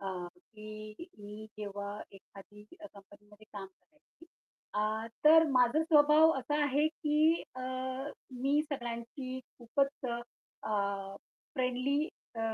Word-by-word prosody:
अ, 195 - -4 0.2
की 215 - -10
मी 210 +1 -9
जेव्हा 205 0 -5
एखादी 200 +1 -14 0.2
कंपनीमध्ये 205 -4 -14
काम 200 -2 -6
करायची, 300 - -23 0.5
अ, 215 +1 0 0.2
तर 320 +1 +9
माझा 255 +4 +4
स्वभाव 310 0 +6
असा 295 +4 0
आहे, 290 +2 +3
की 310 +1 +2
अ, 255 - -6 0.8
मी 285 +2 +4
सगळ्यांशी 240 0 -4 0.2
खूपच 275 +3 0 0.6
अ, 200 -2 -1 0.4
फ्रेंडली 260 +4 +1 0.3
अ, 225 - -4
240 Hz, 105 wpm, -32 LUFS, 210-295 Hz, 0.8 s, तर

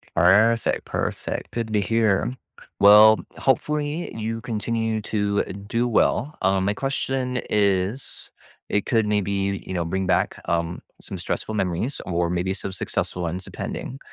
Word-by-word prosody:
Perfect, 105 +7 +4
perfect, - - -3
good 115 -2 -3
to 105 - +3
hear. 110 +3 +1 0.4
Well, 105 +2 +8 0.2
hopefully, 150 +4 0
you 115 +1 -3
continue 115 -1 -2
to 105 -1 0
do 100 +5 -2
well, 120 +4 +1
um, 95 0 +2
my 100 - +1
question 130 0 -2
is 100 +4 0 0.4
it 105 - 0
could 115 -3 +2
maybe, 100 -1 0
you - - -5
know, 85 -2 0
bring 95 +3 -1
back, - - +1
um, 85 0 -1 0.2
some - - -6
stressful 110 - -3
memories 95 +6 -1
or 85 -1 0
maybe 90 +2 -1
some 95 0 -4
successful 90 -1 -3
ones 85 +3 -3
depending, 135 +7 -6
105 Hz, 140 wpm, -24 LUFS, 95-115 Hz, 0.4 s, Well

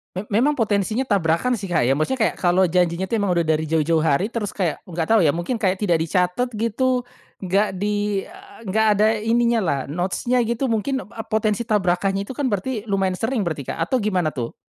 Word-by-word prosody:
Me 185 - -2
memang 245 +9 +2
potensinya 215 -2 0
tabrakan 200 +6 +1
sih 200 - -6
Kak 175 -7 +1
ya, 135 - +2
maksudnya 245 +10 -1
kayak - - +1
kalau 180 0 +2
janjinya 180 +1 +1
tuh 230 - +1
emang 200 -3 +1
udah 170 - +2
dari 160 -1 0
jauh-jauh 160 +1 +1
hari, 160 +5 +1
terus 225 -4 -4
kayak 175 -6 -1
nggak 170 -1 -4
tahu 220 -6 +5
ya 145 - +3
mungkin 175 +9 -2
kayak 190 -3 0
tidak 175 -5 +2
dicatet 180 +9 0
gitu, 240 +4 0 0.4
nggak 195 +2 +1
di 205 +1 -1
eee, 200 - -14
nggak 220 +3 +2
ada 205 +1 +3
ininya 235 +2 +2
lah 140 -4 0
notes-nya 185 - -1
gitu? 235 +3 -1
Mungkin 245 +5 -1
ap 215 +3 -9
potensi 215 +1 +1
tabrakannya 195 -2 0
itu - - -4
kan 285 - -1
berarti 220 0 -2
lumayan 195 -3 0
sering 230 +2 -1
berarti 155 -7 -3
Kak - - -5
atau 260 - +2
gimana 190 -7 0
tuh? 120 -6 -5
200 Hz, 205 wpm, -22 LUFS, 175-225 Hz, 0.4 s, tahu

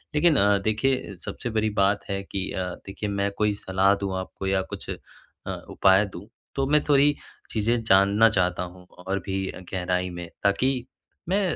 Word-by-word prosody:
लेकिन 160 +1 +4
अ, 100 0 +4
देखिए 110 +2 0
सबसे 120 - -4
बड़ी 110 -1 +1
बात 100 +1 +2
है 100 0 -1
कि 95 -1 -4
अ, 95 - -2 0.2
देखिए 100 +1 -4
मैं 100 0 0
कोई 105 -1 +2
सलाह 95 0 +2
दूँ 100 -1 -3
आपको 95 +1 -6
या 95 0 +2
कुछ - - -7
अ, - - -2 0.7
उपाय 95 +2 +4
दूँ 100 +1 -10 0.3
तो 135 -1 +1
मैं 150 +1 +3
थोड़ी 145 0 +5 0.4
चीज़ें 115 +2 +1
जानना 100 +2 +5
चाहता 90 -4 +1
हूँ 90 0 -10 0.2
और 95 +1 0
भी 95 0 -2 0.3
गहराई 90 0 0
में 85 -1 -7
ताकि 125 +5 +1 0.4
मैं 195 +3 +2
100 Hz, 170 wpm, -25 LUFS, 95-115 Hz, 0.7 s, थोड़ी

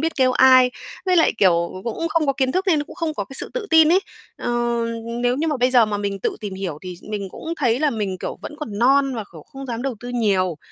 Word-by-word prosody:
biết 325 +1 -1
kêu 260 -2 +3
ai, 255 -1 +6 0.4
với 365 - +3
lại, 325 - +4
kiểu, 170 -3 +3
cũng 185 - -8
cũng 335 - -2
không 325 -1 +1
có 275 - +3
kiến 265 -1 0
thức 375 +2 -1
nên 310 -6 +2
cũng - - -13
không 325 -3 -2
có - - -3
cái 270 - -12
sự - - -6
tự - - -3
tin 320 0 +6
ấy. 375 - +5 0.4
Ờ, - - -5 0.7
nếu 245 +1 +2
như 320 +3 0
mà 300 - 0
bây 250 +1 +2
giờ 245 -3 +5
mà 210 -1 -2
mình 200 -1 -3
tự - - -2
tìm 205 -3 -5
hiểu 185 -6 -5
thì 180 -1 -6 0.2
mình 200 -2 -3
cũng 330 - -6
thấy 245 -3 +1
là 300 -1 +2
mình, 205 -6 -3
kiểu, - - -5
vẫn - - -7
còn 210 -9 -5
non 270 +2 +3
và, 220 -3 -4
kiểu, 160 -3 -11
không 270 0 -10
dám 235 -1 -4
đầu 270 -2 -2
tư 245 - -7
nhiều, 195 -8 +1
255 Hz, 275 wpm, -21 LUFS, 205-300 Hz, 0.7 s, ai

